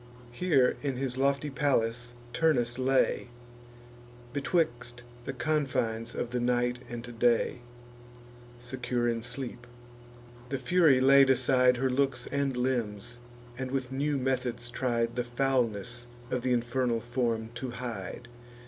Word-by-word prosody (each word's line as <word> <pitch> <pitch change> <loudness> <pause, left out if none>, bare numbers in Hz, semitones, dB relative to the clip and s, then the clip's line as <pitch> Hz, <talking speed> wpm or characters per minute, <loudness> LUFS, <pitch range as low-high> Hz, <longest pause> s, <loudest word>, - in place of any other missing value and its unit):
Here, 135 -2 +2
in 140 -3 -1
his 130 -1 -3
lofty 140 +2 +1
palace, 120 -4 0 0.2
Turnus 125 -7 +1
lay, 130 -1 +2 1.1
Betwixt 130 -5 -1 0.2
the - - -2
confines 130 -6 -1
of 120 - -3
the 125 - -1
night 125 0 +1
and 120 -1 -7
day, 120 0 +2 1.0
Secure 120 -1 -2
in 115 -1 0
sleep. 120 0 -6 0.8
The 135 - -1
Fury 145 0 +4
laid 135 +1 +6
aside 125 -1 +4
Her 130 +1 +1
looks 130 -2 0
and 140 -2 0
limbs, 120 -2 -2 0.4
and 130 -1 -3
with 130 -1 -2
new 140 +2 0
methods 125 -2 -2
tried 120 -2 0
The 125 - 0
foulness 120 -2 -1 0.2
of 125 - 0
th' 130 - -3
infernal 120 -1 +1
form 120 -2 -1
to 125 +2 -5
hide. 120 -1 -6
125 Hz, 125 wpm, -29 LUFS, 120-135 Hz, 1.1 s, laid